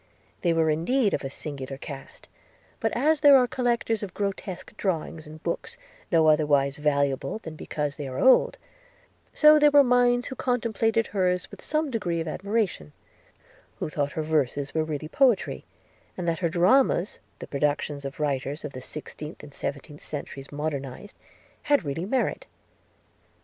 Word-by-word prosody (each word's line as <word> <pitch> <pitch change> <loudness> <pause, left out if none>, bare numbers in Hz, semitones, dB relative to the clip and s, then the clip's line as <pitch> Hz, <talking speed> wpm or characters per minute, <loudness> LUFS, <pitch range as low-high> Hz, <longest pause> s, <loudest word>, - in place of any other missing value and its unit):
– - - -36
They 175 - +2
were 160 -1 +3
indeed 205 - +1
of - - -1
a 135 - -3
singular 135 -1 -6
cast: 135 -1 -10 0.5
but 225 - 0
as 305 +4 +3
there 285 -2 +8
are 255 - +4
collectors 240 -3 0
of 195 -3 -6
grotesque 195 -2 -4
drawings, 165 -4 -3
and 155 +1 -12
books, 170 - -4 0.3
no 165 -2 +4
otherwise 145 -3 +3
valuable 140 0 0
than 160 -7 -9
because 150 -2 -3
they 145 -3 -5
are 130 0 -6
old; 260 - +5 0.7
so 305 0 +7
there 295 0 +6
were 285 -1 +7
minds 245 -1 +3
who 265 - -6
contemplated 225 -3 0
hers 180 -2 0
with - - -11
some 305 -2 0
degree 175 -8 -1
of 165 - -3
admiration; 195 - -2 0.8
who - - -3
thought 145 -2 -2
her 155 - -2
verses 145 -2 0
were 160 - +1
really 155 -1 -4
poetry, 250 - +2 0.5
and 180 -2 -3
that 165 -1 0
her 170 -2 +1
dramas 185 +3 +3 0.2
(the - - -8
productions 145 0 -1
of 135 +1 -7
writers 145 0 -2
of 145 - -6
the 130 - -7
sixteenth 150 +3 -8
and 145 -1 -12
seventeenth 145 +2 -6
centuries 140 -2 -7
modernized) 145 +3 -5 0.5
had 285 - +4
really 145 +5 -3
merit. 255 +6 -1
160 Hz, 160 wpm, -26 LUFS, 145-225 Hz, 0.8 s, there